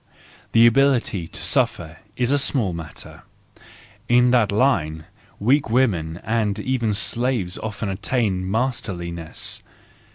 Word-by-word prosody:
The 115 0 +6
ability 120 -8 +2
to - - -9
suffer 80 -1 0 0.2
is 125 +1 0
a 145 - +3
small 120 -9 +1
matter: 80 -2 -9 0.9
in 125 0 +4
that 120 -5 +3
line, 85 - +1 0.3
weak 135 +5 +2
women 90 -10 +1
and 110 -2 -1
even 120 -2 -1
slaves 115 -3 0
often 105 -1 -5
attain 100 0 -1
masterliness. 95 -8 -3
110 Hz, 110 wpm, -22 LUFS, 90-125 Hz, 0.9 s, The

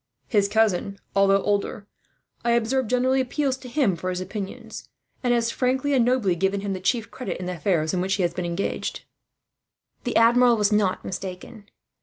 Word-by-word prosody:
His 205 -4 +2
cousin, 200 -2 +1 0.2
although 195 0 +4
older, 205 0 -1 0.6
I 235 0 +2
observe 235 +2 +1
generally 255 +2 +2
appeals 265 +1 -1
to 255 -1 -11
him 240 - +2
for 185 +2 -4
his 180 0 -2
opinion; 195 +1 -6 0.5
and 245 - +2
has 235 -1 +2
frankly 265 +3 0
and 255 -3 +4
nobly 235 -7 +2
given 195 +3 0
him 200 -1 -2
the 185 - -4
chief 225 +4 -1
credit, 255 - -5
in 180 - -5
the 180 -1 -4
affairs 165 -2 0
in 180 - 0
which 190 +2 0
he 195 - 0
has 170 -1 0
been 180 - -3
engaged." 175 +3 -3 1.0
The 245 - -3
Admiral 235 +1 +5
was 210 0 +2
not 205 -3 +1
mistaken. 190 +3 -7
210 Hz, 185 wpm, -24 LUFS, 190-245 Hz, 1.0 s, Admiral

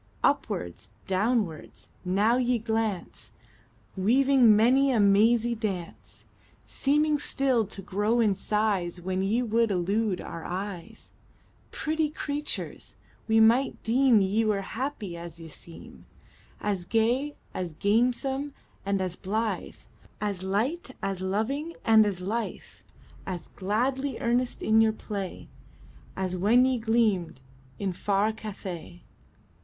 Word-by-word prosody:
Upwards, 90 +3 -1 0.2
downwards, 195 -4 -1
now 200 +6 +2
ye 250 -1 +2
glance, 220 -4 -3 0.7
Weaving 245 +3 +5
many 255 +6 +4
a 240 - +2
mazy 220 +4 +4
dance; 200 -7 -6 0.4
Seeming 300 +2 +1
still 260 -6 +1
to 195 -1 -6
grow 205 +5 0
in 215 -4 +4
size 195 -3 -1
When 185 +1 -2
ye 220 +6 +1
would 230 0 +2
elude 195 +2 0
our 165 - -7
eyes 185 -1 -6 0.6
Pretty 310 0 -1
creatures! 295 0 -5 0.3
we 220 0 +4
might 235 +5 +3
deem 240 -1 +4
Ye 200 +4 +1
were 210 -2 +1
happy 220 -5 -4
as 170 -1 -9
ye 165 - -9
seem 165 +2 -13 0.5
As 200 -4 -2
gay, 240 +8 +1 0.2
as 180 -3 -4
gamesome, 250 - 0 0.3
and 195 -1 0
as 185 -2 -3
blithe, 215 +4 -2 0.4
As 200 -3 -2
light, 225 - -1
as 195 -1 -2
loving, 240 - -2
and 220 -1 +6
as 190 -3 -3
lithe, 220 +5 -3 0.6
As 180 -3 -5
gladly 260 +8 -1
earnest 240 +1 0
in 220 +1 +4
your 220 -1 +3
play, 200 -4 -6 0.7
As 185 -1 -2
when 220 +8 +4
ye 260 -2 +1
gleamed 220 - +1 0.4
in 195 -2 -2
far 200 +3 +1
Cathay. 190 -5 -8
215 Hz, 120 wpm, -27 LUFS, 190-240 Hz, 0.7 s, and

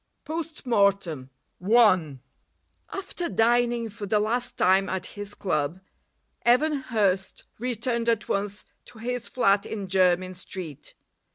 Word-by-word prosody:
POST 320 -1 -5
MORTEM 200 - +1 0.3
I 185 - +4 0.7
After 360 -3 -4
dining 235 0 +2
for 205 -1 -7
the 210 +1 +2
last 235 +4 -1
time 190 +2 +3
at 185 -1 -3
his 205 0 -5
club, 160 -2 -1 0.6
Evan 265 +6 +4
Hurst 205 -7 0 0.2
returned 235 0 -1
at 230 -2 0
once 205 +1 -2 0.2
to 240 - -15
his 245 +1 -3
flat 200 -5 +3
in 205 -3 -5
Jermyn 185 -1 +2
Street. 180 -5 -7
210 Hz, 120 wpm, -26 LUFS, 190-240 Hz, 0.7 s, I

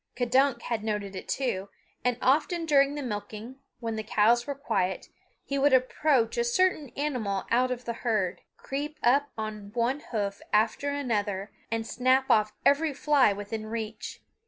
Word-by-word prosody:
K'dunk 250 0 +2
had 230 -3 -2
noted 210 -2 -3
it 185 - -7
too, 200 -8 -2 0.3
and 250 -1 +1
often 315 +6 +2
during 280 -2 +4
the 290 - -4
milking, 215 +2 -6 0.2
when 230 -2 -3
the - - -1
cows 230 +4 +3
were 285 - -2
quiet, 190 -9 -1 0.4
he 280 0 -1
would 280 0 +4
approach 255 -2 +2
a - - +3
certain 300 +3 +1
animal 240 -10 -1
out 250 +2 +3
of 250 0 -4
the 235 - -2
herd, 195 -6 0 0.2
creep 290 +3 -4
up 280 +4 +3
on 215 -2 -5
one 245 +4 +1
hoof 200 -3 -2
after 220 +7 +2
another 210 -8 -2 0.2
and 225 0 -2
snap 255 +3 +2
off 215 -2 +4
every 290 0 +3
fly 285 -5 +4
within 210 +2 -5
reach. 220 -1 -6
240 Hz, 160 wpm, -28 LUFS, 215-275 Hz, 0.4 s, during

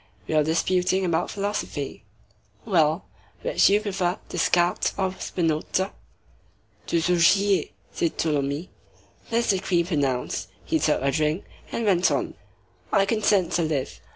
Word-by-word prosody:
"We - - -2
were 155 -1 +4
disputing 180 +4 +1
about 170 -2 0
philosophy." 205 +1 -3 0.6
"Well?" 165 -4 +2 0.4
"Which - - +4
do 195 - +4
you 210 - +2
prefer, 190 -4 -1
Descartes 175 0 +1
or 190 -1 0
Spinoza?" 170 +3 -1 0.9
"Désaugiers," 180 +4 +3 0.2
said 170 - -1
Tholomyès. 145 +2 -1 0.6
This 230 -1 +2
decree 185 -2 +1
pronounced, 140 -7 -1 0.2
he - - +1
took - - +1
a 140 - +2
drink, 155 +4 0 0.3
and 230 - -2
went 185 -3 +4
on:— - - -1 0.6
"I 195 - +4
consent 200 -4 +2
to 175 - +1
live. 155 -5 -2
175 Hz, 125 wpm, -25 LUFS, 160-195 Hz, 0.9 s, were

